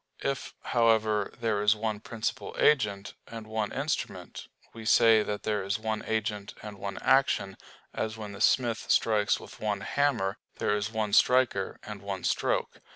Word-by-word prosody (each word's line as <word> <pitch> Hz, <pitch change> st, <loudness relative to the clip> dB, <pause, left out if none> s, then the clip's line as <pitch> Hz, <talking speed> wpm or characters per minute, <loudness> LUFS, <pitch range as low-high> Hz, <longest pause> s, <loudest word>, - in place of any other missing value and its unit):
If, 140 Hz, 0 st, -3 dB
however, 110 Hz, -3 st, +2 dB
there 110 Hz, -3 st, 0 dB
is 105 Hz, +1 st, +4 dB
one 110 Hz, -1 st, -2 dB
principal 110 Hz, 0 st, -4 dB
agent, 105 Hz, -8 st, +2 dB
and 115 Hz, -1 st, -8 dB
one 110 Hz, -1 st, -2 dB
instrument, 140 Hz, +3 st, -4 dB, 0.3 s
we 115 Hz, -, -9 dB
say 110 Hz, 0 st, +6 dB
that 105 Hz, -1 st, -4 dB
there 105 Hz, -1 st, 0 dB
is 100 Hz, +1 st, -1 dB
one 110 Hz, 0 st, -3 dB
agent 105 Hz, -2 st, -2 dB
and 105 Hz, -2 st, -8 dB
one 100 Hz, 0 st, -5 dB
action, 115 Hz, -8 st, +3 dB, 0.4 s
as 110 Hz, 0 st, -3 dB
when 105 Hz, -2 st, -7 dB
the 100 Hz, 0 st, -9 dB
smith 115 Hz, -1 st, +2 dB
strikes 105 Hz, -2 st, +3 dB
with -, -, -12 dB
one 105 Hz, -2 st, -1 dB
hammer, 110 Hz, -6 st, 0 dB, 0.2 s
there 105 Hz, -, +1 dB
is 105 Hz, +1 st, -2 dB
one 110 Hz, -2 st, -2 dB
striker 125 Hz, -6 st, +3 dB
and 105 Hz, -2 st, -8 dB
one 100 Hz, -2 st, -5 dB
stroke. -, -, 0 dB
110 Hz, 160 wpm, -28 LUFS, 105-115 Hz, 0.4 s, say